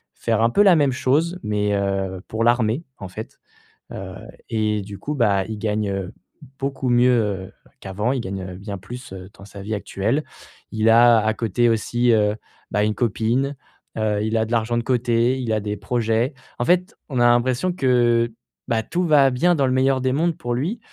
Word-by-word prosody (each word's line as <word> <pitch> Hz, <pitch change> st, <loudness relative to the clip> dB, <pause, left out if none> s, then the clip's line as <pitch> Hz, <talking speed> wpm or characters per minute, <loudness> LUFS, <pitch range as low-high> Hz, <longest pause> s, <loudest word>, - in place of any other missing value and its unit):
faire 115 Hz, -1 st, 0 dB
un 115 Hz, -, +4 dB
peu 205 Hz, +12 st, +4 dB
la 190 Hz, -4 st, +6 dB
même 145 Hz, -3 st, +3 dB
chose 160 Hz, +8 st, +1 dB
mais, 105 Hz, -1 st, 0 dB
heu, 95 Hz, -1 st, -2 dB
pour 110 Hz, +1 st, -2 dB
l'armée, 120 Hz, +4 st, +2 dB
en 95 Hz, -, -7 dB
fait, 110 Hz, +4 st, -9 dB, 0.5 s
heu 95 Hz, 0 st, -7 dB, 0.3 s
et 105 Hz, -2 st, 0 dB
du 100 Hz, 0 st, -9 dB
coup, 150 Hz, -, -4 dB
bah, 100 Hz, -6 st, +2 dB
il 110 Hz, -1 st, -5 dB
gagne, 105 Hz, -1 st, -1 dB
heu, 95 Hz, -2 st, -4 dB, 0.5 s
beaucoup 135 Hz, -1 st, -3 dB
mieux, 120 Hz, +1 st, +4 dB
heu, 95 Hz, -3 st, -3 dB, 0.3 s
qu'avant, 105 Hz, +6 st, -2 dB
il 130 Hz, -, -2 dB
gagne, 95 Hz, -1 st, -5 dB
heu, 90 Hz, -1 st, -7 dB
bien 100 Hz, 0 st, -6 dB
plus, 120 Hz, +4 st, -10 dB
heu, 95 Hz, 0 st, -9 dB
dans 95 Hz, -, -13 dB
sa 100 Hz, -1 st, -10 dB
vie 110 Hz, +2 st, -4 dB
actuelle. 110 Hz, +8 st, -1 dB, 0.5 s
Il 110 Hz, 0 st, 0 dB
a 120 Hz, 0 st, +7 dB
à 110 Hz, -, +2 dB
côté 115 Hz, +2 st, 0 dB
aussi, 120 Hz, +2 st, +1 dB
heu, 105 Hz, -1 st, +2 dB, 0.4 s
bah, 105 Hz, -, +1 dB
une 105 Hz, 0 st, 0 dB
copine, 120 Hz, +4 st, 0 dB, 0.4 s
heu, 105 Hz, -1 st, 0 dB
il 110 Hz, +1 st, 0 dB
a 110 Hz, -, +1 dB
de 115 Hz, -, -9 dB
l'argent 115 Hz, 0 st, 0 dB
de 120 Hz, -, -1 dB
côté, 125 Hz, 0 st, +1 dB
il 120 Hz, -3 st, -3 dB
a 110 Hz, -, +1 dB
des 105 Hz, 0 st, -4 dB
projets. 120 Hz, +2 st, 0 dB, 0.3 s
En 120 Hz, -, 0 dB
fait, 180 Hz, +1 st, +1 dB
on 130 Hz, -3 st, -2 dB
a 120 Hz, -, +5 dB
l'impression 125 Hz, +9 st, +1 dB
que, 120 Hz, -5 st, +2 dB, 0.4 s
bah, 110 Hz, -1 st, 0 dB
tout 180 Hz, +7 st, -1 dB
va 140 Hz, -3 st, +5 dB
bien 175 Hz, +8 st, +2 dB
dans 140 Hz, -3 st, +2 dB
le -, -, 0 dB
meilleur 130 Hz, 0 st, +2 dB
des 130 Hz, 0 st, +1 dB
mondes 165 Hz, +2 st, 0 dB
pour 120 Hz, 0 st, -3 dB
lui. 180 Hz, -, -2 dB
115 Hz, 205 wpm, -22 LUFS, 105-130 Hz, 0.5 s, a